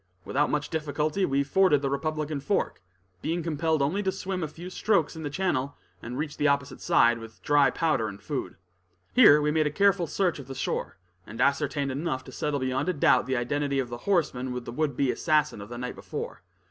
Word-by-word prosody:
Without 145 +2 +1
much 150 0 -1
difficulty 155 +3 0
we 140 0 +1
forded 150 -1 +3
the 135 - +1
Republican 155 +1 -2
Fork, 195 - -1 0.4
being 165 +2 -2
compelled 160 -1 0
only 170 +9 0
to 190 -2 0
swim 185 0 -4
a 160 - -1
few 175 +5 -9
strokes 185 -7 +1
in 160 - -7
the 150 - -3
channel, 145 -5 -1 0.2
and 120 +2 -6
reached 150 +1 -4
the 150 - +3
opposite 140 -1 0
side, 120 0 +4
with 115 0 -11
dry 145 -2 +4
powder 155 -7 0
and 100 -1 -8
food. 145 -4 -4 0.6
Here 210 - +8
we 150 0 +1
made 155 0 +2
a - - -2
careful 195 0 +3
search 180 -4 0
of 135 - -9
the 135 - -7
shore, 100 - -3 0.3
and 115 +2 -9
ascertained 140 +1 +1
enough 130 -2 -2
to 130 - -11
settle 145 +2 -2
beyond 130 +6 -1
a - - +1
doubt 140 -5 +3
the 130 -1 0
identity 140 +3 -1
of 130 -3 -1
the 120 - -5
horseman 130 -9 +1
with 125 -1 -5
the - - -6
would 145 0 -1
be 135 -2 +2
assassin 150 -8 +1
of 100 - -9
the 120 - -7
night 125 +1 -4
before. - - -6
145 Hz, 215 wpm, -27 LUFS, 130-160 Hz, 0.6 s, Here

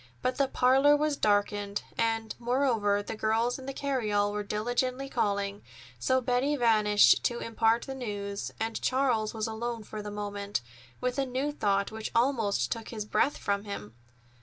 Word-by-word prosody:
But 255 - 0
the 275 - +3
parlor 270 +3 +4
was 300 0 +1
darkened, 205 -2 0
and, 225 -1 0
moreover, 235 -5 +1
the 220 - -5
girls 225 +4 0
in 260 - -10
the - - -2
carryall 220 -8 0
were 210 0 -2
diligently 245 +6 -1
calling; 200 -5 -1 0.4
so 260 0 +2
Betty 255 +4 +1
vanished 215 -5 +5
to 240 - +1
impart 230 0 +1
the 270 - -5
news, 205 -5 -4
and 225 0 -2
Charles 245 -5 +1
was 220 -1 -1
alone 230 +1 -4
for 215 0 -7
the 210 - -6
moment, 205 -3 -3 0.4
with 250 +2 -1
a 275 - +2
new 260 +4 -1
thought, 200 -7 0
which 220 0 -5
almost 225 - +1
took 225 -1 -4
his 215 -3 -5
breath 280 +6 +1
from 200 0 -1
him. 115 - -6
225 Hz, 165 wpm, -29 LUFS, 205-255 Hz, 0.4 s, vanished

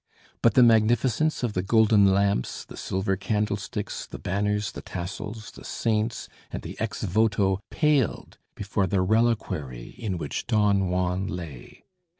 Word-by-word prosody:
But 115 - +4
the 125 - +8
magnificence 120 +6 +3
of 120 -4 0
the 90 - 0
golden 105 0 +5
lamps, 100 -8 0
the - - -11
silver 95 +1 -1
candlesticks, 105 +2 -2
the - - -8
banners, 105 +2 -1
the - - -8
tassels, 100 +5 -6
the - - -13
saints 110 0 -1 0.2
and - - -5
the - - -7
"ex - - -3
voto" 100 -1 +2
paled 150 - 0 0.2
before 100 -1 -1
the 95 0 +1
reliquary 95 - 0
in 100 -6 -2
which 75 -4 -4
Don 100 -3 +2
Juan 90 +1 0
lay. 80 -8 -8
105 Hz, 145 wpm, -26 LUFS, 95-110 Hz, 0.2 s, the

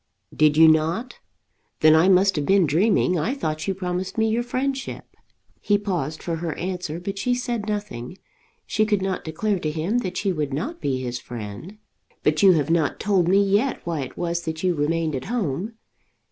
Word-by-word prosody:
"Did 155 -1 +4
you 160 0 +8
not? 160 +10 +1 0.6
Then 155 0 +7
I 165 +4 +5
must 195 +1 +4
have 150 -2 -1
been 195 -2 +4
dreaming. 180 +3 +2
I 235 - -1
thought 155 - -3
you 195 - 0
promised 180 +1 -4
me 220 0 +3
your 225 +2 +1
friendship." 265 +2 -3 0.6
He 205 - +2
paused 175 -7 -3
for 165 -2 -2
her 165 -1 -4
answer, 180 -3 -4
but 195 +2 -5
she 245 +4 +1
said 240 -4 -3
nothing. 205 - -4 0.5
She 215 - +1
could 210 -3 +1
not 190 -1 -2
declare 190 +5 -1
to 155 - -2
him 165 +10 -1
that 185 -5 -4
she 200 - 0
would 150 -5 -2
not 305 - -4
be 135 -2 -1
his 120 0 -3
friend. 120 - -8 0.5
"But 150 0 +2
you 195 -2 +7
have 155 -1 0
not 165 -3 +1
told 190 -4 +2
me 195 +3 +4
yet 205 +7 0
why 170 -2 -2
it 130 - -7
was 170 0 -1
that 160 +1 -4
you 180 -1 +2
remained 160 0 0
at 130 - -5
home. 210 - -2
180 Hz, 195 wpm, -23 LUFS, 155-205 Hz, 0.6 s, you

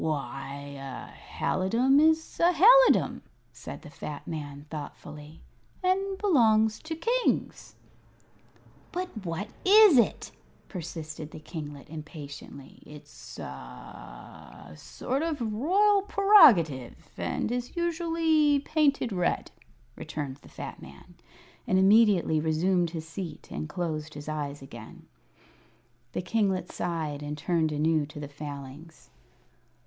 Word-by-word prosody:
"Why, 140 -2 -3 0.2
a 135 -1 -8 0.3
halidom 235 +9 +2
is 320 +1 +2
a 345 +1 +5
halidom," - - +6 0.3
said - - -10
the - - -11
fat 150 -1 -8
man, 145 -3 -6
thoughtfully; 150 0 -9 0.4
"and 385 +1 0
belongs 220 - +3
to 320 +1 -6
kings." 475 +9 -1 1.2
"But 365 +1 -3
what 175 +4 -4
is 400 - +7
it?" 235 - 0 0.4
persisted 160 -4 -7
the - - -10
kinglet, 150 -2 -8
impatiently. 150 -3 -10
"It's 150 -1 -13
a - - -6
a 60 -1 -11
a 75 - -13
sort 265 - -4
of 320 -3 -2
a 235 - -2
royal 380 - +3
prerogative, 240 - +4
and - - -2
is 245 0 -4
usually 325 -3 +2
painted 280 -4 +1
red," 180 -2 -1 0.4
returned 140 -3 -6
the - - -18
fat - - -8
man, 70 - -14 0.5
and 185 - +2
immediately 195 -5 +4
resumed 170 +3 +1
his 160 -1 -7
seat 170 +1 -8
and 155 - -5
closed 155 -2 -4
his 145 0 -9
eyes 145 -2 -4
again. 115 -4 -12 1.1
The - - -3
kinglet 190 -3 0
sighed, 160 -4 -3
and 145 0 -5
turned 160 +1 0
anew 155 0 +1
to 150 - -10
the 145 - -6
Failings. 145 +2 -10
170 Hz, 120 wpm, -28 LUFS, -, 1.2 s, is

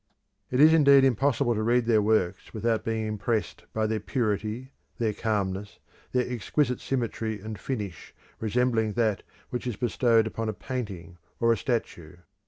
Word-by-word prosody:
It 125 - 0
is 155 +2 +8
indeed 140 -4 +7
impossible 135 0 +2
to 110 - -1
read 120 +2 +2
their 110 -2 +4
works 105 -2 0
without 110 0 0
being 110 -1 -1
impressed 110 +1 -2
by 110 0 0
their 110 0 0
purity, 110 +2 -2 0.3
their 110 -3 0
calmness, 100 -2 -2 0.3
their 125 -1 +1
exquisite 125 +2 0
symmetry 115 -4 -2
and 110 +1 -7
finish 105 -10 -5 0.3
resembling 115 -1 +1
that 110 -4 +1 0.3
which 125 0 -3
is 120 - -2
bestowed 115 -1 +2
upon 110 0 -3
a - - -2
painting 95 -9 -6 0.2
or 115 0 +4
a - - -2
statue. 90 - -3
110 Hz, 155 wpm, -27 LUFS, 105-125 Hz, 0.3 s, is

